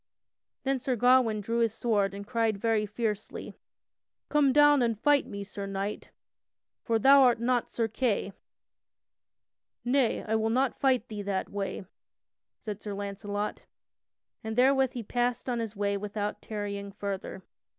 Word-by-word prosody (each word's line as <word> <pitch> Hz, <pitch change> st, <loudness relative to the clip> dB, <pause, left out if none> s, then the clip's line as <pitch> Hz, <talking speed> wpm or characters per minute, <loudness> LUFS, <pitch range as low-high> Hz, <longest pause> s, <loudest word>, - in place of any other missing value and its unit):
Then 270 Hz, 0 st, 0 dB
Sir 255 Hz, 0 st, -1 dB
Gawain 245 Hz, -2 st, +4 dB
drew 230 Hz, +3 st, -1 dB
his 225 Hz, -2 st, +1 dB
sword 205 Hz, -5 st, +1 dB
and 200 Hz, 0 st, -7 dB
cried 225 Hz, -2 st, 0 dB
very 215 Hz, 0 st, +1 dB
fiercely: 210 Hz, -1 st, -4 dB, 0.8 s
"Come 295 Hz, -2 st, +4 dB
down 290 Hz, 0 st, +6 dB
and 230 Hz, -3 st, 0 dB
fight 290 Hz, +2 st, +3 dB
me, 200 Hz, 0 st, -6 dB
Sir 200 Hz, 0 st, -6 dB
Knight! 195 Hz, +1 st, -4 dB, 0.7 s
For 230 Hz, -, +1 dB
thou 275 Hz, +5 st, +7 dB
art 245 Hz, -3 st, +5 dB
not 245 Hz, 0 st, 0 dB
Sir 230 Hz, -1 st, -1 dB
Kay!" 220 Hz, -3 st, -1 dB, 1.5 s
"Nay, 250 Hz, -1 st, +2 dB
I 220 Hz, -, -3 dB
will 220 Hz, 0 st, 0 dB
not 255 Hz, +2 st, +1 dB
fight 255 Hz, -4 st, +2 dB
thee 210 Hz, -2 st, -6 dB
that 200 Hz, -1 st, -2 dB
way," 195 Hz, -1 st, -4 dB, 0.7 s
said 210 Hz, -2 st, -7 dB
Sir 205 Hz, -2 st, -5 dB
Launcelot, 205 Hz, +1 st, -4 dB, 0.8 s
and 220 Hz, 0 st, -4 dB
therewith 265 Hz, +1 st, +4 dB
he 240 Hz, -, -5 dB
passed 245 Hz, +3 st, -1 dB
on 245 Hz, -2 st, -1 dB
his 225 Hz, -2 st, -4 dB
way 200 Hz, 0 st, 0 dB
without 205 Hz, +1 st, -4 dB
tarrying 200 Hz, -2 st, -5 dB
further. 195 Hz, -1 st, -5 dB
220 Hz, 150 wpm, -29 LUFS, 205-245 Hz, 1.5 s, thou